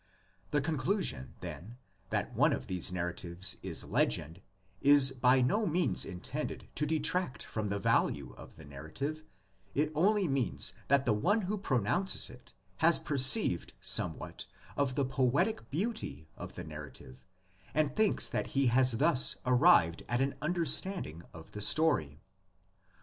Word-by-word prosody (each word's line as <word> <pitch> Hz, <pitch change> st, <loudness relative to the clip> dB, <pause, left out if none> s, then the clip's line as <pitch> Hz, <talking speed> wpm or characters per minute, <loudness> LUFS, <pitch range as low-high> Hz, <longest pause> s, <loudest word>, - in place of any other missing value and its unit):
The 145 Hz, +6 st, +1 dB
conclusion, 145 Hz, -, -1 dB
then, 110 Hz, +8 st, -8 dB, 0.3 s
that -, -, -2 dB
one -, -, +3 dB
of -, -, -4 dB
these 90 Hz, -1 st, -1 dB
narratives 90 Hz, +1 st, -3 dB
is -, -, -5 dB
legend 80 Hz, +7 st, -1 dB, 0.4 s
is 140 Hz, -1 st, +6 dB
by 130 Hz, 0 st, +3 dB
no 205 Hz, -, +1 dB
means 170 Hz, -2 st, +1 dB
intended 90 Hz, -1 st, -6 dB
to 150 Hz, -, -2 dB
detract 160 Hz, -1 st, -1 dB
from 105 Hz, -2 st, -4 dB
the 100 Hz, -, -1 dB
value 70 Hz, -8 st, 0 dB
of -, -, -13 dB
the 80 Hz, -, -13 dB
narrative; 80 Hz, -, -6 dB, 0.5 s
it 150 Hz, +2 st, +1 dB
only 195 Hz, +5 st, +2 dB
means 135 Hz, -8 st, -1 dB
that 140 Hz, -1 st, +3 dB
the 115 Hz, -, +2 dB
one 205 Hz, -, +1 dB
who 200 Hz, +2 st, -2 dB
pronounces 175 Hz, -, +1 dB
it 125 Hz, 0 st, -15 dB, 0.3 s
has 165 Hz, +7 st, +4 dB
perceived 135 Hz, -, +3 dB
somewhat -, -, -1 dB, 0.3 s
of 135 Hz, -3 st, -1 dB
the 140 Hz, -, +1 dB
poetic 130 Hz, -, 0 dB
beauty 150 Hz, -, -4 dB
of -, -, -9 dB
the -, -, -6 dB
narrative 75 Hz, -4 st, -11 dB, 0.5 s
and 155 Hz, -1 st, 0 dB
thinks 215 Hz, -2 st, +2 dB
that -, -, -2 dB
he 140 Hz, -, +3 dB
has 130 Hz, -1 st, +4 dB
thus 135 Hz, +2 st, +5 dB
arrived 125 Hz, -, +4 dB
at 120 Hz, 0 st, 0 dB
an 135 Hz, +1 st, 0 dB
understanding 165 Hz, -, -1 dB
of 80 Hz, -, -13 dB
the 105 Hz, -, -7 dB
story. 105 Hz, -, +1 dB
130 Hz, 145 wpm, -31 LUFS, -, 0.5 s, is